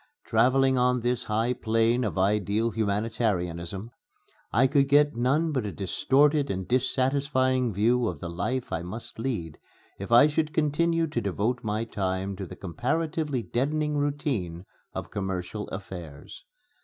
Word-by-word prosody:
Travelling 130 +3 +3
on 125 0 +2
this 120 0 -1
high 115 +3 +1
plane 115 +1 +1
of 105 -3 -2
ideal 105 +3 +1
humanitarianism, 100 -3 -2 0.6
I 120 +5 +4
could 140 +1 +3
get 145 -2 +4
none 140 +7 +1
but 130 -5 -1
a 105 - -3
distorted 140 - +2
and 95 -1 -3
dissatisfying 130 0 +1
view 115 +4 +2
of 85 -7 -4
the 85 - -5
life 105 +10 -3
I 80 - -1
must 110 +6 -8
lead 110 - -3 0.4
if 100 +3 -6
I 120 +4 +8
should 155 +1 0
continue 165 +2 +2
to 145 -7 -2
devote 110 +5 -1
my 110 0 -1
time 95 -2 -2
to 95 - -5
the - - -9
comparatively 145 - -2
deadening 150 +5 -1
routine 140 - -2 0.3
of - - -6
commercial 95 +1 -4
affairs. 90 -7 -9
115 Hz, 145 wpm, -27 LUFS, 100-135 Hz, 0.6 s, I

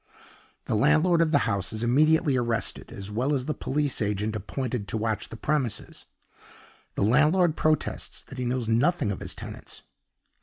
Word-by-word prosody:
The - - -2
landlord 155 +9 +4
of 165 - +3
the 145 -2 +3
house 100 -4 -1
is 110 +1 -3
immediately 150 +4 +3
arrested, 120 -2 -2
as 100 +1 -7
well 130 +7 0
as 130 -2 -2
the 150 - -1
police 145 -2 -1
agent 105 +1 -1
appointed 115 +1 -3
to - - -2
watch 110 -1 -2
the 115 - -8
premises. 130 -3 -2 0.9
The - - 0
landlord 155 - +4
protests 155 0 -1
that 135 - -10
he 125 - -2
knows 120 -1 -1
nothing 125 - +2
of 95 - -4
his - - -4
tenants. - - -8
125 Hz, 165 wpm, -26 LUFS, 110-150 Hz, 0.9 s, landlord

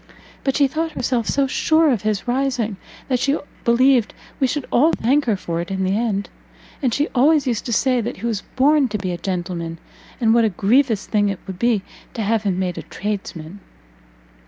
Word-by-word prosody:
But 270 - 0
she 285 -2 +4
thought 320 +3 -3
herself 245 -4 -1
so 280 -1 +2
sure 315 +3 +3
of 230 -6 0
his 215 0 -2
rising, 245 -5 0 0.3
that 255 -2 +1
she 275 +3 +1 0.3
believed 245 0 +3 0.2
we 265 - +3
should 285 +2 -2
all 300 +7 +4
thank 275 +6 +2
her 225 -4 +2
for 170 -2 -3
it 175 - -7
in 190 0 -2
the 190 +1 +1
end. 210 -3 -1 0.5
And 260 -4 +1
she 290 +6 +1
always 290 +3 +3
used 240 -3 -2
to - - -3
say 250 +1 +2
that 230 - -4
he - - -6
was 220 -4 -1
born 285 +1 +4
to 210 -2 -3
be 190 -2 -3
a 175 - -3
gentleman, 175 -2 -3 0.4
and 225 -3 +3
what 235 0 +4
a 220 - +3
grievous 220 +3 +2
thing 205 -2 +1
it 195 - -2
would 190 -2 -7
be 235 -5 +2 0.3
to 225 - -2
have 220 +1 +1
him 195 -4 -1
made 185 -1 -2
a - - -11
tradesman." 195 -3 -5
230 Hz, 205 wpm, -21 LUFS, 195-265 Hz, 0.5 s, she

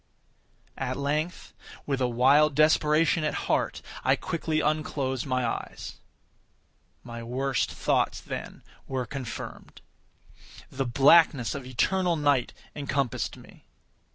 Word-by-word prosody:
At 130 -1 -2
length, 150 +5 -2 0.3
with 135 -2 -1
a 125 - +3
wild 135 +5 +4
desperation 155 +1 +3
at 150 - -1
heart, - - 0 0.2
I - - +4
quickly 160 -1 -2
unclosed 145 -4 -1
my 130 -1 0
eyes. 115 - -5 1.1
My 115 -1 -8
worst 130 +2 -1
thoughts, - - 0
then, - - -7 0.2
were 130 -2 -2
confirmed. 125 -3 -7 0.9
The 135 0 -2
blackness 140 0 +5
of 135 -3 -6
eternal 175 +8 +1
night 145 -5 +2 0.2
encompassed 140 -3 -2
me. - - -17
140 Hz, 110 wpm, -27 LUFS, 130-155 Hz, 1.1 s, blackness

